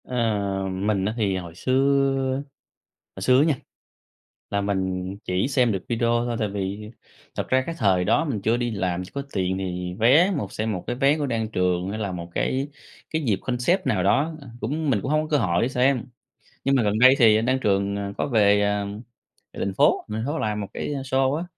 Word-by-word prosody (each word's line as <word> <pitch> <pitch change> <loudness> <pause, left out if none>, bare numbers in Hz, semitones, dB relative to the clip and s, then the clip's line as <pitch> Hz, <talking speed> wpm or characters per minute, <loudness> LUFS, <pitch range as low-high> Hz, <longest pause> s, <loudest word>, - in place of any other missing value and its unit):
Ờ, 125 - -6 0.6
mình 95 +1 0
á 105 - -1
thì 100 -4 0
hồi 85 -3 -8
xưa 135 +2 +1
á, 135 - -3 0.7
hồi 95 - -6
xưa 125 +5 +5
á 145 - +4
nha, 155 -3 +2 1.0
là 100 - 0
mình 95 -1 -2
chỉ 90 +7 0
xem 125 -4 +2
được 95 -2 -4
video 115 0 0 0.2
thôi, 120 -1 -2
tại 105 - 0
vì 100 +2 -4 0.4
thật - - -3
ra 130 0 +3
cái 165 - -3
thời 95 -6 +2
đó 150 - +2
mình 130 -10 -2
chưa 115 +4 +2
đi 120 -1 -1
làm, 90 -4 -2
chưa - - -13
có 140 - -2
tiền 95 -1 -1
thì 90 -1 -4
vé 150 - +5
một 140 - -4
xem 110 +1 -2
một 90 -4 -5
cái 120 - -2
vé 140 +3 +3
của 145 - -1
Đan 115 -4 -1
Trường 90 -2 0
hay 110 - -4
là 100 -3 -3
một 85 -1 -6
cái 135 +2 -1 0.4
cái 160 0 -1
dịp 105 -6 +1
concept 125 +9 0
nào 95 -4 +1
đó, 140 - +2
à, 135 - -11
cũng 150 +6 -1
mình 110 -6 +2
cũng 135 - -3
hông 155 0 +2
có 155 - -6
cơ 150 - +3
hội 90 -7 +1
để 120 - +2
xem. 130 -1 +1 0.6
Nhưng 135 0 +2
mà 125 - +3
gần 105 +1 +1
đây 130 +2 +8
thì 110 -4 +6
anh 110 - 0
Đan 130 +1 +1
Trường, 100 -3 +1
ờ, 100 0 -4
có - - -1
về, 105 -5 +4
à, 105 0 0 0.7
về - - -9
thành 100 - -2
phố, - - +3
về 105 - -3
thành 110 - -2
phố 150 +3 -2
làm 105 -1 -1
một 100 - -5
cái - - -4
show 135 -1 0
á, 165 - -2
110 Hz, 235 wpm, -24 LUFS, 95-135 Hz, 1.0 s, đây